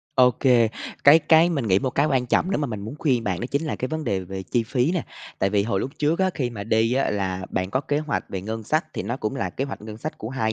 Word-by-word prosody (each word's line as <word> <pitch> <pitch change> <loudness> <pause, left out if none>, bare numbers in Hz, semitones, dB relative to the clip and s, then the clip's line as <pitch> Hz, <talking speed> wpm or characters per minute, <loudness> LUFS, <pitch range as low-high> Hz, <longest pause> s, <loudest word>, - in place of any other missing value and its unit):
Ô 125 -1 +6
kê, 120 -2 +3 0.4
cái 145 +3 +9
cái 165 +1 +5
mình 140 -8 -1
nghĩ 95 0 +4
một 130 - -1
cái 145 +4 +2
quan 130 -4 +1
trọng 180 +9 +1
nếu 195 - +1
mà 150 - 0
mình 110 -5 -5
muốn 110 +7 -6
khuyên 125 -7 +1
bạn 95 -3 -1
đó 120 - -2
chính 140 +2 0
là 155 - -2
cái 130 - -3
vấn 155 0 -3
đề 95 -7 0
về 95 +1 -6
chi 95 +7 0
phí 125 +7 0
nè. 175 -4 -1 0.3
Tại 95 - +1
vì 100 0 +2
hồi 100 -2 -1
lúc 135 - -3
trước 150 +3 +1
á, 190 0 +2
khi 125 -4 -1
mà 105 -4 -6
đi 110 +2 +2
á 135 - +1
là 95 -2 -2
bạn 95 0 -2
có 130 - +1
kế 145 +1 -1
hoạch 155 -2 -2
về 95 - -4
ngân 110 +3 -5
sách, 155 +9 0
thì - - -4
nó 115 +6 -3
cũng 110 -5 -3
là 95 - -2
kế 135 - -3
hoạch 140 - -7
ngân 105 0 -8
sách 155 +6 -6
của 110 - -5
2 110 -4 -1
120 Hz, 310 wpm, -24 LUFS, 105-145 Hz, 0.4 s, cái